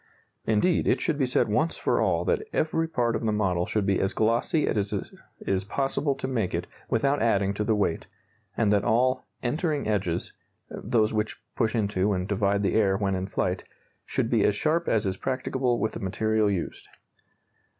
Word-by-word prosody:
Indeed, 115 Hz, +12 st, +2 dB
it -, -, +3 dB
should 155 Hz, -3 st, -1 dB
be 135 Hz, -, +2 dB
said 125 Hz, -1 st, +2 dB
once 130 Hz, +11 st, +1 dB
for -, -, +1 dB
all -, -, +1 dB
that 470 Hz, -2 st, +1 dB
every 160 Hz, +1 st, +1 dB
part 120 Hz, -7 st, 0 dB
of -, -, -3 dB
the 110 Hz, -, +1 dB
model 95 Hz, -4 st, 0 dB
should 105 Hz, -2 st, 0 dB
be 95 Hz, -1 st, +2 dB
as 95 Hz, -, -1 dB
glossy 120 Hz, +8 st, +2 dB
as 105 Hz, -2 st, 0 dB
it -, -, -4 dB, 0.3 s
is 95 Hz, -1 st, 0 dB
possible 135 Hz, +5 st, -1 dB
to -, -, -4 dB
make 110 Hz, -10 st, -1 dB
it 85 Hz, +1 st, -2 dB, 0.2 s
without 140 Hz, +5 st, +1 dB
adding 100 Hz, -3 st, +2 dB
to 105 Hz, -, -2 dB
the 110 Hz, 0 st, +2 dB
weight, 100 Hz, -5 st, -1 dB, 0.5 s
and 105 Hz, -3 st, +3 dB
that 100 Hz, -1 st, +2 dB
all 125 Hz, +4 st, +2 dB, 0.2 s
"entering 150 Hz, +2 st, -1 dB
edges" 95 Hz, -5 st, -1 dB, 0.4 s
(those 110 Hz, -2 st, 0 dB
which 105 Hz, 0 st, -2 dB, 0.2 s
push 115 Hz, -1 st, 0 dB
into 105 Hz, -2 st, +1 dB
and 90 Hz, 0 st, -2 dB
divide 100 Hz, 0 st, +1 dB
the 95 Hz, -, +1 dB
air 100 Hz, -3 st, +3 dB
when 100 Hz, -1 st, 0 dB
in 95 Hz, 0 st, -2 dB
flight) 90 Hz, -1 st, -1 dB, 0.4 s
should -, -, -2 dB
be -, -, +3 dB
as 105 Hz, -, +3 dB
sharp 160 Hz, +9 st, 0 dB
as 110 Hz, -1 st, +2 dB
is 95 Hz, 0 st, -1 dB
practicable 130 Hz, 0 st, -1 dB
with 110 Hz, -, -1 dB
the -, -, -6 dB
material 110 Hz, +1 st, +1 dB
used. 95 Hz, -4 st, -3 dB
110 Hz, 190 wpm, -26 LUFS, 100-130 Hz, 0.5 s, it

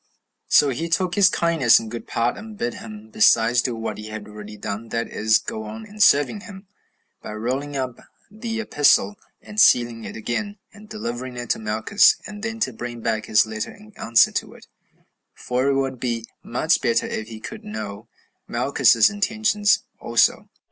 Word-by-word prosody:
So 145 Hz, -, +5 dB
he 160 Hz, +6 st, -3 dB
took 180 Hz, +1 st, 0 dB
his 200 Hz, 0 st, +5 dB
kindness 165 Hz, -8 st, +4 dB
in 115 Hz, -, -7 dB
good 115 Hz, +1 st, -7 dB
part, 115 Hz, +1 st, 0 dB
and 220 Hz, -1 st, -10 dB
bid 240 Hz, +2 st, -2 dB
him 215 Hz, 0 st, -10 dB
besides 120 Hz, -, +4 dB
do 125 Hz, -2 st, -2 dB
what 115 Hz, -1 st, -5 dB
he 105 Hz, -, -8 dB
had 110 Hz, -1 st, -7 dB
already 105 Hz, 0 st, -10 dB
done, 105 Hz, +2 st, -6 dB
that 115 Hz, +1 st, -2 dB
is, 110 Hz, +1 st, +2 dB
go 110 Hz, -, -6 dB
on 110 Hz, +1 st, -8 dB
in 210 Hz, +1 st, -14 dB
serving 145 Hz, 0 st, +4 dB
him, 200 Hz, -2 st, -12 dB, 0.6 s
by -, -, -7 dB
rolling 130 Hz, +6 st, -3 dB
up 130 Hz, -2 st, -4 dB, 0.3 s
the 225 Hz, +1 st, -5 dB
epistle 205 Hz, -1 st, +3 dB, 0.3 s
and 210 Hz, -, -6 dB
sealing 120 Hz, -, +4 dB
it -, -, -8 dB
again, 205 Hz, -, -4 dB, 0.2 s
and 210 Hz, 0 st, -15 dB
delivering 125 Hz, -, -5 dB
it 120 Hz, -1 st, -3 dB
to -, -, 0 dB
Malchus, 110 Hz, -, +3 dB
and 210 Hz, -1 st, -9 dB
then 225 Hz, +1 st, -4 dB
to 130 Hz, -, 0 dB
bring 120 Hz, +1 st, -7 dB
back 110 Hz, -1 st, -2 dB
his 110 Hz, +1 st, +4 dB
letter 110 Hz, 0 st, -5 dB
in 215 Hz, +1 st, -16 dB
answer 115 Hz, 0 st, +4 dB
to -, -, -4 dB
it; -, -, -16 dB, 0.7 s
for 125 Hz, +2 st, -1 dB
it 140 Hz, -, +2 dB
would 135 Hz, -2 st, -1 dB
be 115 Hz, -2 st, -2 dB, 0.2 s
much -, -, 0 dB
better -, -, +1 dB
if 110 Hz, -, -4 dB
he 110 Hz, -1 st, -9 dB
could -, -, -9 dB
know 105 Hz, -1 st, -7 dB, 0.4 s
Malchus's 120 Hz, -2 st, +4 dB
intentions 210 Hz, 0 st, +1 dB, 0.2 s
also. -, -, +2 dB
125 Hz, 185 wpm, -22 LUFS, -, 0.7 s, So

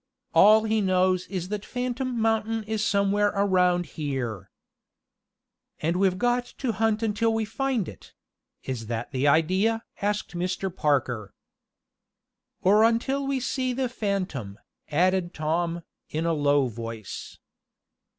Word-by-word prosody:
All 215 Hz, +2 st, +7 dB
he 220 Hz, 0 st, +1 dB
knows 185 Hz, -1 st, +2 dB
is 185 Hz, -2 st, -4 dB
that 210 Hz, -1 st, -3 dB
Phantom 250 Hz, 0 st, -3 dB
Mountain 225 Hz, 0 st, +1 dB
is 215 Hz, 0 st, -2 dB
somewhere 205 Hz, 0 st, +2 dB
around 180 Hz, -3 st, +3 dB
here." 125 Hz, -, -4 dB, 1.3 s
"And 165 Hz, +3 st, 0 dB
we've 185 Hz, 0 st, +2 dB
got 245 Hz, +3 st, +1 dB
to 255 Hz, -4 st, -1 dB
hunt 220 Hz, 0 st, 0 dB
until 225 Hz, +1 st, +1 dB
we 225 Hz, 0 st, 0 dB
find 240 Hz, -, -1 dB
it; -, -, -12 dB, 0.5 s
is 120 Hz, -4 st, -4 dB
that 115 Hz, +1 st, -4 dB
the 135 Hz, +1 st, +1 dB
idea?" 190 Hz, +10 st, +2 dB, 0.2 s
asked 205 Hz, -2 st, -1 dB
Mr. 180 Hz, +1 st, -2 dB
Parker. 125 Hz, -, 0 dB, 1.3 s
"Or 205 Hz, +4 st, +5 dB
until 265 Hz, +5 st, +1 dB
we 275 Hz, -1 st, 0 dB
see 255 Hz, 0 st, -1 dB
the 260 Hz, 0 st, -1 dB
phantom," 185 Hz, -, -3 dB, 0.3 s
added 180 Hz, +3 st, +1 dB
Tom, 165 Hz, +2 st, -1 dB, 0.3 s
in 160 Hz, +2 st, -2 dB
a 170 Hz, -, +2 dB
low 145 Hz, -2 st, +3 dB
voice. 115 Hz, -2 st, -7 dB
190 Hz, 130 wpm, -26 LUFS, 155-225 Hz, 1.3 s, All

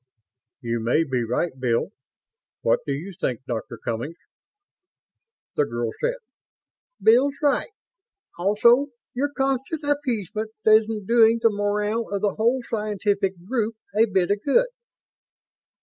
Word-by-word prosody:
"You 115 Hz, -1 st, -2 dB
may 120 Hz, +8 st, +2 dB
be 130 Hz, -5 st, -1 dB
right, 125 Hz, +9 st, -1 dB
Bill. 120 Hz, -2 st, 0 dB, 0.7 s
What -, -, +3 dB
do -, -, -1 dB
you 165 Hz, +8 st, -4 dB
think, 125 Hz, 0 st, -2 dB
Dr. 120 Hz, -4 st, -5 dB
Cummings?" 120 Hz, +9 st, -4 dB, 1.4 s
The 145 Hz, -, +2 dB
girl 120 Hz, -3 st, -3 dB
said: -, -, +1 dB, 0.8 s
"Bill's 255 Hz, +5 st, +4 dB
right. 285 Hz, -, +2 dB, 0.7 s
Also, 235 Hz, +8 st, +4 dB, 0.3 s
your 280 Hz, +4 st, 0 dB
constant 270 Hz, +3 st, -1 dB
appeasement 225 Hz, -, -2 dB
isn't 215 Hz, -1 st, +4 dB
doing 230 Hz, +1 st, +5 dB
the 230 Hz, -1 st, +4 dB
morale 210 Hz, +2 st, -1 dB
of 200 Hz, 0 st, -3 dB
the 205 Hz, -, +2 dB
whole 240 Hz, +3 st, +1 dB
scientific 205 Hz, -2 st, 0 dB
group 225 Hz, -2 st, -1 dB, 0.2 s
a 220 Hz, +2 st, +5 dB
bit 190 Hz, -2 st, +1 dB
of 205 Hz, -, +1 dB
good." 485 Hz, -, +3 dB
210 Hz, 125 wpm, -24 LUFS, 165-235 Hz, 1.4 s, doing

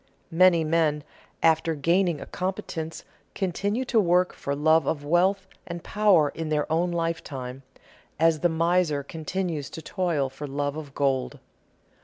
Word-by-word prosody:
Many 170 Hz, 0 st, +5 dB
men 155 Hz, -2 st, +1 dB, 0.4 s
after 160 Hz, 0 st, +3 dB
gaining 170 Hz, +2 st, +1 dB
a -, -, -7 dB
competence 170 Hz, -3 st, -5 dB, 0.3 s
continue 200 Hz, +6 st, -1 dB
to 240 Hz, -2 st, +2 dB
work 180 Hz, -1 st, +3 dB
for 140 Hz, -, -3 dB
love 155 Hz, +2 st, +3 dB
of 145 Hz, -2 st, -2 dB
wealth 185 Hz, +5 st, +2 dB, 0.2 s
and 175 Hz, -1 st, -6 dB
power 200 Hz, -8 st, +3 dB
in 160 Hz, +1 st, -5 dB
their 150 Hz, -1 st, +1 dB
own 170 Hz, +3 st, +2 dB
lifetime, 145 Hz, -6 st, -4 dB, 0.6 s
as 165 Hz, -1 st, +3 dB
the 175 Hz, -, +2 dB
miser 165 Hz, -2 st, +1 dB
continues 160 Hz, 0 st, -4 dB
to 160 Hz, -, -8 dB
toil 170 Hz, -8 st, -1 dB
for 135 Hz, +3 st, -8 dB
love 145 Hz, +1 st, -2 dB
of 150 Hz, -3 st, -8 dB
gold. 135 Hz, -2 st, 0 dB
165 Hz, 145 wpm, -26 LUFS, 150-180 Hz, 0.6 s, Many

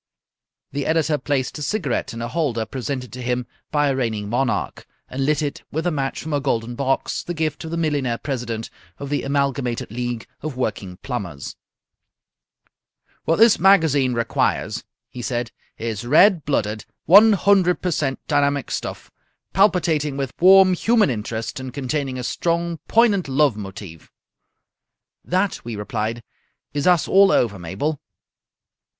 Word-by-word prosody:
The 140 Hz, 0 st, -3 dB
editor 160 Hz, -2 st, +1 dB
placed 135 Hz, +1 st, -2 dB
a -, -, -7 dB
cigarette 150 Hz, -, -1 dB
in 115 Hz, 0 st, -6 dB
a -, -, -2 dB
holder 125 Hz, -6 st, -1 dB
presented 130 Hz, -1 st, -5 dB
to 125 Hz, -, -7 dB
him 125 Hz, 0 st, -1 dB, 0.2 s
by 145 Hz, -1 st, +2 dB
a 135 Hz, -, +1 dB
reigning 110 Hz, -5 st, -2 dB
monarch, 125 Hz, +2 st, -1 dB, 0.2 s
and 135 Hz, +1 st, -2 dB
lit 150 Hz, 0 st, +1 dB
it 145 Hz, -, -4 dB
with 160 Hz, +3 st, -2 dB
a 175 Hz, -, +2 dB
match 135 Hz, -3 st, -2 dB
from 155 Hz, 0 st, -4 dB
a 145 Hz, -, +2 dB
golden 120 Hz, -4 st, -1 dB
box, 135 Hz, +1 st, -1 dB
the 175 Hz, -, -5 dB
gift 160 Hz, 0 st, -2 dB
of -, -, -5 dB
the 170 Hz, -, -3 dB
millionaire 145 Hz, -7 st, 0 dB
president 120 Hz, -5 st, -4 dB, 0.3 s
of 140 Hz, -, -7 dB
the 145 Hz, -, 0 dB
Amalgamated 135 Hz, -5 st, -1 dB
League 120 Hz, 0 st, -3 dB, 0.2 s
of 150 Hz, -4 st, -5 dB
Working 100 Hz, -7 st, -3 dB
Plumbers. 95 Hz, -, -5 dB, 1.7 s
"What 165 Hz, -, +3 dB
this 225 Hz, +2 st, +5 dB
magazine 160 Hz, -9 st, +4 dB
requires," 115 Hz, 0 st, -1 dB, 0.2 s
he 125 Hz, -, -8 dB
said, 120 Hz, -1 st, -3 dB, 0.3 s
"is 115 Hz, -1 st, -4 dB
red 160 Hz, -, +5 dB
blooded, 110 Hz, -6 st, -1 dB, 0.2 s
one 210 Hz, +5 st, +8 dB
hundred 190 Hz, -2 st, +3 dB
per 180 Hz, -, 0 dB
cent 140 Hz, -4 st, -1 dB
dynamic 140 Hz, -2 st, +1 dB
stuff, -, -, -5 dB, 0.4 s
palpitating 165 Hz, -7 st, +2 dB
with 135 Hz, -2 st, -3 dB
warm 190 Hz, 0 st, +7 dB
human 215 Hz, -, +3 dB
interest 110 Hz, +1 st, -4 dB
and 130 Hz, -1 st, -6 dB
containing 135 Hz, 0 st, -3 dB
a 125 Hz, -, -4 dB
strong, 170 Hz, +4 st, -1 dB
poignant 215 Hz, -7 st, +3 dB
love 135 Hz, -2 st, +2 dB
motive." 95 Hz, -5 st, -9 dB, 1.1 s
"That," 185 Hz, +2 st, -1 dB
we 120 Hz, -1 st, -5 dB
replied, 110 Hz, +3 st, -3 dB, 0.5 s
"is 145 Hz, +2 st, -1 dB
us 175 Hz, -3 st, +4 dB
all 195 Hz, 0 st, +6 dB
over, 105 Hz, -5 st, +1 dB
Mabel." 100 Hz, -, -3 dB
140 Hz, 150 wpm, -22 LUFS, 120-160 Hz, 1.7 s, one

